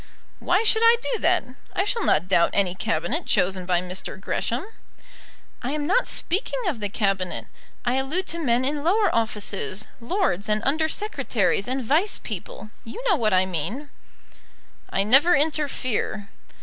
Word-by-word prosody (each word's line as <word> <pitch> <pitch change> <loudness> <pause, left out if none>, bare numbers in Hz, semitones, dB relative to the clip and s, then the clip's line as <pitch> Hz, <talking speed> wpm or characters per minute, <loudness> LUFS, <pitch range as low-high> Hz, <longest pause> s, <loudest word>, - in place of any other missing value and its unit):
"Why 365 +5 +2
should 445 0 +4
I 460 +1 +7 0.2
do 460 - -1
that? 360 0 +2 0.3
I 380 - +1
shall 440 +2 -1
not 165 +4 +2
doubt 170 -3 +4
any 190 -3 +1
Cabinet 235 - -2
chosen 185 -1 +1
by 175 -1 +2
Mr. 185 +1 -5
Gresham." 235 - -2 1.0
"I'm 290 +4 -2
not 400 +10 +2
speaking 410 +7 -1
of 290 -10 -1
the 205 -1 -2
Cabinet; 195 -3 -1 0.4
I 245 +2 +1
allude 300 +8 -1
to 335 - -2
men 250 -4 +1
in 290 +1 -1
lower 390 +3 +2
offices, 210 -2 -2
lords, 235 - -1
and 215 +1 +1
Under 315 +3 +2
Secretaries, 250 - 0
and 260 +1 -2
Vice 325 - +2
people. 210 0 -8
You 230 - -8
know 395 - +5
what 225 -8 +1
I 185 0 +4
mean." 200 - -4 1.0
"I 195 - +1
never 275 +11 +6
interfere." 275 -8 -1
255 Hz, 155 wpm, -24 LUFS, 200-335 Hz, 1.0 s, I